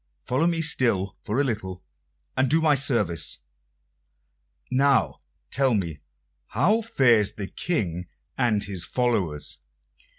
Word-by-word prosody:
Follow 130 Hz, +7 st, +1 dB
me 165 Hz, -1 st, 0 dB
still 110 Hz, -, +2 dB
for 110 Hz, +6 st, -2 dB
a -, -, +4 dB
little, 95 Hz, -, -4 dB, 0.5 s
and 130 Hz, 0 st, +1 dB
do 160 Hz, -, +3 dB
me 155 Hz, -2 st, +3 dB
service. 105 Hz, -, +1 dB, 1.3 s
Now, 135 Hz, +1 st, +2 dB, 0.3 s
tell 135 Hz, -3 st, +2 dB
me, 85 Hz, -6 st, -3 dB, 0.5 s
how 195 Hz, -, +2 dB
fares 120 Hz, -, +3 dB
the 100 Hz, -, -5 dB
King 90 Hz, -, -3 dB, 0.3 s
and 115 Hz, -5 st, +1 dB
his 95 Hz, -4 st, -3 dB
followers?" 100 Hz, -, -1 dB
120 Hz, 120 wpm, -25 LUFS, 95-140 Hz, 1.3 s, a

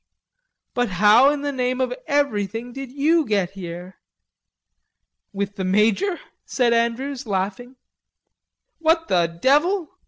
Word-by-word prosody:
"But 245 Hz, -2 st, 0 dB
how 210 Hz, +8 st, +5 dB
in 290 Hz, -1 st, -2 dB
the 290 Hz, -, -1 dB
name 255 Hz, -1 st, -2 dB
of 255 Hz, -1 st, 0 dB
everything 240 Hz, -, -1 dB
did 270 Hz, -1 st, -7 dB
you 310 Hz, +4 st, +2 dB
get 200 Hz, -7 st, -1 dB
here?" 180 Hz, -1 st, -9 dB, 1.3 s
"With 200 Hz, 0 st, -4 dB
the 190 Hz, -, -3 dB
major?" 215 Hz, -, +1 dB, 0.2 s
said 240 Hz, -3 st, +1 dB
Andrews, 245 Hz, +3 st, -1 dB
laughing. 205 Hz, +6 st, -3 dB, 1.0 s
"What 325 Hz, 0 st, +1 dB
the 175 Hz, -2 st, +3 dB
devil?" 295 Hz, -, +1 dB
245 Hz, 120 wpm, -22 LUFS, 200-280 Hz, 1.3 s, how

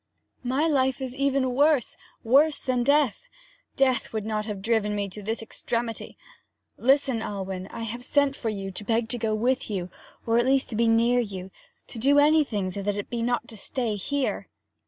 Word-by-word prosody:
'My 265 Hz, +6 st, +1 dB
life 265 Hz, -4 st, +1 dB
is 260 Hz, -1 st, -4 dB
even 275 Hz, -2 st, +1 dB
worse 285 Hz, -1 st, +3 dB, 0.3 s
worse 285 Hz, +6 st, +4 dB
than 255 Hz, -1 st, 0 dB
death. 285 Hz, -, +2 dB, 0.5 s
Death 260 Hz, -3 st, +1 dB
would 220 Hz, -2 st, -3 dB
not 215 Hz, 0 st, -2 dB
have 200 Hz, -3 st, -5 dB
driven 215 Hz, -2 st, +1 dB
me 200 Hz, -1 st, -1 dB
to 210 Hz, +3 st, -9 dB
this 220 Hz, +2 st, -3 dB
extremity. 230 Hz, 0 st, -4 dB, 0.6 s
Listen, 265 Hz, -2 st, +2 dB
Alwyn 190 Hz, -3 st, -4 dB
I 230 Hz, -, -8 dB
have 235 Hz, +2 st, -5 dB
sent 285 Hz, +1 st, +2 dB
for 230 Hz, -, -3 dB
you 195 Hz, -2 st, -4 dB
to 190 Hz, -, -7 dB
beg 225 Hz, +1 st, 0 dB
to 245 Hz, 0 st, -2 dB
go 220 Hz, -1 st, 0 dB
with 250 Hz, +4 st, 0 dB
you, 185 Hz, -4 st, -3 dB, 0.3 s
or 230 Hz, 0 st, +3 dB
at 240 Hz, -, +2 dB
least 270 Hz, 0 st, +2 dB
to -, -, -3 dB
be 230 Hz, +1 st, +2 dB
near 230 Hz, +2 st, +4 dB
you 190 Hz, -5 st, -4 dB, 0.3 s
to 230 Hz, -, -9 dB
do 280 Hz, +5 st, +4 dB
anything 290 Hz, -11 st, +3 dB
so 200 Hz, -, -5 dB
that 205 Hz, +1 st, -1 dB
it 205 Hz, -, -5 dB
be 235 Hz, -1 st, -2 dB
not 240 Hz, 0 st, 0 dB
to 225 Hz, -, -8 dB
stay 230 Hz, +2 st, -2 dB
here.' 275 Hz, +7 st, -2 dB
235 Hz, 195 wpm, -26 LUFS, 210-265 Hz, 0.6 s, worse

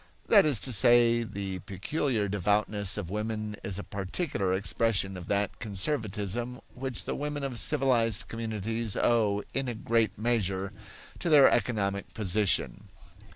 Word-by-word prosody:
That 200 Hz, -7 st, +7 dB
is 140 Hz, -8 st, +2 dB
to 130 Hz, -, -2 dB
say, 120 Hz, +2 st, +5 dB
the 100 Hz, -4 st, -5 dB
peculiar 105 Hz, -, -2 dB
devoutness 105 Hz, +1 st, 0 dB
of 95 Hz, -4 st, -5 dB
women 105 Hz, 0 st, -3 dB
is 95 Hz, -2 st, -3 dB
a 100 Hz, -, -5 dB
particular 95 Hz, -, -2 dB
expression 95 Hz, -1 st, +1 dB
of 90 Hz, -2 st, -8 dB
that 100 Hz, 0 st, -1 dB
conservatism 110 Hz, +1 st, -2 dB
which 130 Hz, -1 st, -4 dB
the -, -, -2 dB
women 145 Hz, 0 st, -3 dB
of 130 Hz, -4 st, -2 dB
civilized 125 Hz, -7 st, +2 dB
communities 115 Hz, -1 st, -3 dB
owe, 105 Hz, -3 st, +2 dB
in 135 Hz, -2 st, -1 dB
great 115 Hz, -4 st, +1 dB
measure, 100 Hz, -4 st, -1 dB, 0.5 s
to 175 Hz, -, -1 dB
their 145 Hz, -3 st, +7 dB
economic 100 Hz, -4 st, -1 dB
position. 105 Hz, -1 st, +1 dB
110 Hz, 135 wpm, -29 LUFS, 100-120 Hz, 0.5 s, That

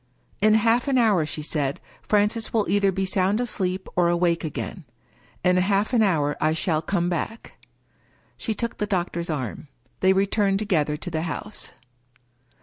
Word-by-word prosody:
" -, -, -37 dB
In 215 Hz, +1 st, +5 dB
half 230 Hz, +4 st, +3 dB
an 270 Hz, -2 st, +2 dB
hour," 205 Hz, -10 st, +3 dB
she 150 Hz, -, -5 dB
said, 145 Hz, -3 st, -2 dB
" -, -, -27 dB
Francis 210 Hz, +2 st, +2 dB
will 220 Hz, -3 st, +1 dB
either 200 Hz, -1 st, +3 dB
be 190 Hz, +1 st, -1 dB
sound 190 Hz, +2 st, +1 dB
asleep, 190 Hz, -6 st, -2 dB
or 175 Hz, -1 st, +3 dB
awake 170 Hz, -1 st, +1 dB
again. 155 Hz, -, -5 dB, 0.6 s
In 180 Hz, 0 st, +4 dB
half 200 Hz, +5 st, +1 dB
an 235 Hz, -, +4 dB
hour 155 Hz, -8 st, +2 dB
I 155 Hz, 0 st, +3 dB
shall 160 Hz, -2 st, 0 dB
come 175 Hz, +1 st, 0 dB
back." 180 Hz, +6 st, -5 dB, 0.7 s
She 220 Hz, -, -3 dB
took 235 Hz, +1 st, -3 dB
the 210 Hz, -, -1 dB
doctor's 175 Hz, -3 st, -2 dB
arm. 140 Hz, -2 st, -4 dB, 0.3 s
They 190 Hz, -, +4 dB
re 195 Hz, +1 st, +3 dB
turned 200 Hz, -1 st, +1 dB
together 160 Hz, -8 st, 0 dB
to 175 Hz, +3 st, -7 dB
the 160 Hz, -1 st, -1 dB
house. 175 Hz, +6 st, -6 dB
190 Hz, 175 wpm, -24 LUFS, 170-210 Hz, 0.7 s, In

